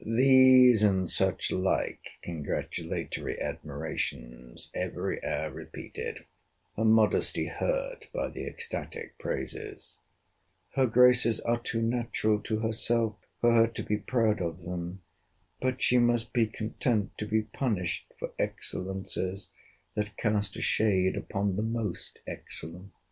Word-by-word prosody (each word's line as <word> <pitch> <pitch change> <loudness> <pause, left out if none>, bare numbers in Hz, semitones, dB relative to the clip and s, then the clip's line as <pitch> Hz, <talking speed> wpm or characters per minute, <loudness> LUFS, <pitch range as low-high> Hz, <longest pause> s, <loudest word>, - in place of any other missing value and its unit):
These 130 0 +7
and 95 -3 +3
such - - +1
like 95 +1 -1
congratulatory 80 -4 -3
admirations - - -5
every - - -3
hour - - -1
repeated. - - -7 0.5
Her 110 - 0
modesty 110 -1 +3
hurt - - -2
by - - -2
the - - -6
ecstatic 465 -1 -6
praises:—'Her 405 - -5
graces 120 -1 +5
are 120 0 +1
too 115 -1 -2
natural 115 -2 +1
to 110 +1 -2
herself 115 0 +1 0.3
for 120 0 +5
her 115 0 +6
to 115 - -5
be 105 - 0
proud 110 -4 +1
of 85 0 -3
them: 90 +1 -5 0.6
but 130 0 0
she 125 - +5
must 120 -1 +2
be 115 -3 +3
content 110 -1 -1
to 105 - -3
be 110 0 +2
punished 105 -8 -2
for - - -5
excellencies 95 0 -3 0.4
that 105 -1 -3
cast 105 -3 0
a - - -5
shade 95 -4 +2
upon 100 -1 -1
the - - +1
most 110 -4 -3
excellent! 90 +5 -7
110 Hz, 120 wpm, -29 LUFS, 95-120 Hz, 0.6 s, These